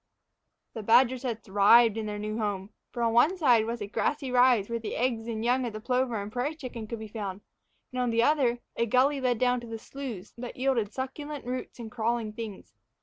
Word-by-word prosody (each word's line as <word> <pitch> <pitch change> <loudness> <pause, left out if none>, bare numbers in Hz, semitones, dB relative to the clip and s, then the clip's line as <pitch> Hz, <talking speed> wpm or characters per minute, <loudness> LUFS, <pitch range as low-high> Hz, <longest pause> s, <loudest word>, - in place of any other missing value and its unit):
The 225 - -5
badgers 245 +4 +4
had 235 -4 -3
thrived 210 +3 +5
in 220 -1 -3
their 210 0 -4
new 215 +2 -4
home, 205 -2 -3 0.2
for 240 - -3
on 230 -1 +2
one 300 +11 +4
side 240 -9 +4
was 230 0 -4
a - - -2
grassy 270 +5 -1
rise 245 -5 +4
where 235 0 -2
the 225 - -5
eggs 235 -2 -1
and 225 -1 -3
young 255 +2 +2
of 225 - -6
the 215 - -5
plover 250 -1 0
and 200 +1 -6
prairie 255 +7 -2
chicken 245 -7 -7
could 230 - -5
be 220 0 -7
found; 205 -3 -5 0.5
and, 255 0 -2
on 245 - +1
the 230 0 +2
other, 250 -4 +2
a 235 - 0
gully 270 +5 +3
led 250 -2 +1
down 250 +1 +2
to 240 - -9
the 225 0 -5
sloughs 230 -5 -8
that 245 0 -7
yielded 250 -5 +1
succulent 275 +3 -5
roots 255 +1 -5
and 230 -3 -8
crawling 230 -1 -1
things. 215 -3 -8
235 Hz, 220 wpm, -28 LUFS, 220-255 Hz, 0.5 s, thrived